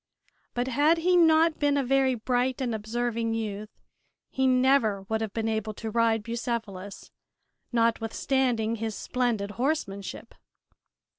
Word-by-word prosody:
But 245 +1 -1
had 290 +6 +3
he 360 +2 +2
not 325 -1 +4
been 290 -1 +2
a 280 - +1
very 265 0 +2
bright 250 +3 0
and 250 -3 -1
observing 230 +1 -2
youth 215 -1 -4 0.6
he 265 0 +1
never 255 -6 +3
would 220 +3 -2
have 220 -2 -3
been 225 +1 -2
able 220 -1 -2
to 220 +1 -5
ride 225 -1 +2
Bucephalus, 225 -4 -5 0.6
notwithstanding 230 0 0
his 220 -1 -3
splendid 230 -5 -1
horsemanship. 200 -9 -3
235 Hz, 130 wpm, -27 LUFS, 220-265 Hz, 0.6 s, not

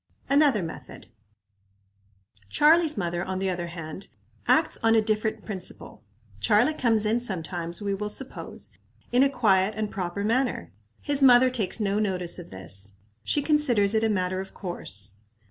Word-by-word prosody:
Another 280 - +3
Method. 165 - -9 1.4
Charlie's 315 - +4
mother, 175 -2 -2
on 190 0 -4
the 190 0 -1
other 175 -1 -4
hand, 170 +2 -8 0.4
acts - - +3
on 225 0 +4
a - - +6
different 215 0 -2
principle. 190 - -6 0.4
Charlie 215 - +3
comes 225 -7 +1
in 220 +3 +2
sometimes, 175 -4 -4
we 200 -1 -1
will 210 +2 -3
suppose, 260 +5 -6 0.4
in 245 +1 +4
a 275 - +5
quiet 205 -6 +2
and 215 -1 -2
proper 190 +1 -3
manner. 230 - 0 0.3
His 285 -1 0
mother 255 -1 +6
takes 225 -4 -1
no 205 -1 0
notice 185 -4 -1
of 175 - -10
this. 95 +2 -7 0.3
She 290 - +1
considers 250 -10 +2
it 220 0 +2
a 225 - +2
matter 185 -2 -1
of 195 - -11
course. 100 - -3
205 Hz, 155 wpm, -26 LUFS, 180-240 Hz, 1.4 s, a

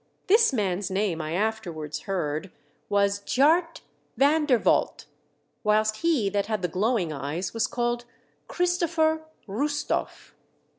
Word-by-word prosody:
This 435 +1 +5
man's 200 -5 -1
name, 190 -4 -1
I 155 +1 -4
afterwards 175 -7 -3
heard, 175 -1 -2 0.4
was 200 0 +2
Tjaart 320 - +2 0.4
Van 295 +2 +3
der 255 -4 +5
Valdt, - - +1 0.6
whilst 215 0 +2
he 320 -11 +1
that 200 0 0
had 215 -4 -2
the - - +2
glowing 185 -1 0
eyes 150 +6 -4
was 225 -1 0
called 240 0 -2 0.4
Christopher 335 -3 +1 0.3
Roostoff. 290 +9 -2
215 Hz, 120 wpm, -26 LUFS, 185-290 Hz, 0.6 s, This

